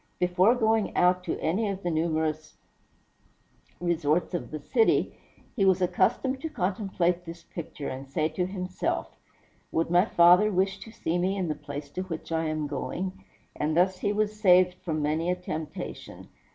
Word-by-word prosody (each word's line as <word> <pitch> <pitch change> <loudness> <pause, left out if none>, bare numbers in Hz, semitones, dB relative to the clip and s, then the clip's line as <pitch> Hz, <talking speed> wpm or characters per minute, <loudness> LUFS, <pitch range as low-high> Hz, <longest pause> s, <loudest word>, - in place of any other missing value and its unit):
Before 180 +6 +3
going 220 -3 +1
out 180 0 +3
to - - -2
any 195 +7 0
of 195 0 -5
the 175 - 0
numerous 155 -1 -1 1.2
resorts 170 -1 0
of 175 - -3
the 155 - -5
city, 225 - +2 0.4
he 210 - +1
was 190 -1 +4
accustomed 245 +9 +1
to 320 - -3
contemplate 185 - -1
this 170 0 -9
picture, 150 -3 -7
and 135 +1 -6
say 155 +2 0
to 180 +3 -2
himself, 185 -1 -3 0.6
"Would 165 +1 0
my 175 +2 +5
father 180 +2 +6
wish 190 +1 0
to 225 - -10
see 175 -6 -2
me 190 +3 0
in 180 -4 -1
the - - +1
place 145 -1 -8
to 185 - -4
which 165 -3 -6
I 165 0 0
am 155 -1 -1
going?" 180 +7 -4 0.3
and 155 +2 -1
thus 185 +1 +2
was 210 +1 +1
he - - -17
saved 180 -3 +5
from 155 -3 -2
many 155 +3 0
a 180 - +2
temptation. 160 -3 -7
180 Hz, 170 wpm, -27 LUFS, 160-195 Hz, 1.2 s, father